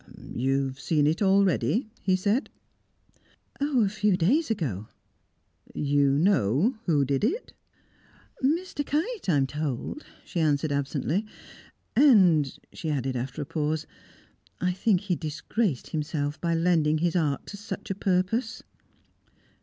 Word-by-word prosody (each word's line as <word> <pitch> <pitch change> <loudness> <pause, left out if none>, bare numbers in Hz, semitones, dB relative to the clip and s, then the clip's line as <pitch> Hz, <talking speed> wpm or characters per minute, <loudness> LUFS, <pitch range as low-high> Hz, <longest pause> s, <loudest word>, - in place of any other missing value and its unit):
"You 135 +2 +1
have 130 0 -6
seen 150 0 +1
it 155 +6 +1
already?" 200 +4 +2
he 185 -1 +2
said. 205 +8 0 1.1
"A 275 -7 +2
few 210 -1 +1
days 245 - +2
ago." 125 - -2 0.9
"You 140 -1 +2
know 180 - +2
who 145 -5 +3
did 135 +4 -1
it?" 360 - -1 0.9
"Mr. 315 +2 0
Kite, 330 - -2
I 155 - +4
am 135 - +3
told," 145 - -4 0.2
she 175 - -4
answered 150 -1 +1
absently. 145 - -1 0.7
"And," 185 - +5 0.2
she 160 - -5
added, 135 -3 -1
after 130 +4 -3
a - - -9
pause, 155 0 -2 0.7
"I 180 +1 +1
think 190 0 +1
he 195 -3 -1
disgraced 160 - -2
himself 150 -1 -2
by 170 -1 +1
lending 165 -2 +2
his 170 +2 0
art 150 -5 0
to 205 - -8
such 205 0 -6
a - - +1
purpose." 195 +5 -1
170 Hz, 130 wpm, -27 LUFS, 145-210 Hz, 1.1 s, And